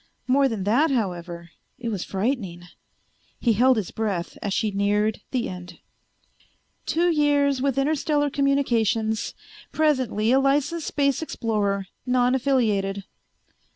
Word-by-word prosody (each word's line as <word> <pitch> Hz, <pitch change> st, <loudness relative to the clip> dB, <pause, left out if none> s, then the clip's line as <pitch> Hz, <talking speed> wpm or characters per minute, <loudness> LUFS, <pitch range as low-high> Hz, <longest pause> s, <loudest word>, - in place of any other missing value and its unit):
More 270 Hz, +2 st, +3 dB
than 220 Hz, -6 st, -3 dB
that, 245 Hz, +11 st, +3 dB
however, 175 Hz, -8 st, -3 dB, 0.3 s
it 235 Hz, -1 st, -4 dB
was 200 Hz, -5 st, -3 dB
frightening. 195 Hz, -4 st, -2 dB, 0.8 s
He 235 Hz, -, +2 dB
held 250 Hz, +3 st, +4 dB
his 205 Hz, -5 st, -3 dB
breath 200 Hz, -6 st, -3 dB
as 200 Hz, -, -3 dB
she 210 Hz, +2 st, 0 dB
neared 205 Hz, +2 st, 0 dB
the 250 Hz, -3 st, -1 dB
end. 180 Hz, -1 st, -8 dB, 0.6 s
"... -, -, -38 dB
two 345 Hz, +2 st, +2 dB
years 285 Hz, -3 st, +2 dB
with 275 Hz, -1 st, 0 dB
Interstellar 290 Hz, 0 st, +1 dB
Communications; 230 Hz, -6 st, +1 dB, 0.4 s
presently 260 Hz, -8 st, +1 dB
a 265 Hz, -, +5 dB
licensed 290 Hz, +4 st, +1 dB
space 280 Hz, -1 st, +1 dB
explorer, 210 Hz, -9 st, -1 dB, 0.2 s
non 250 Hz, 0 st, +3 dB
affiliated." 215 Hz, -7 st, +1 dB
235 Hz, 125 wpm, -24 LUFS, 200-275 Hz, 0.8 s, a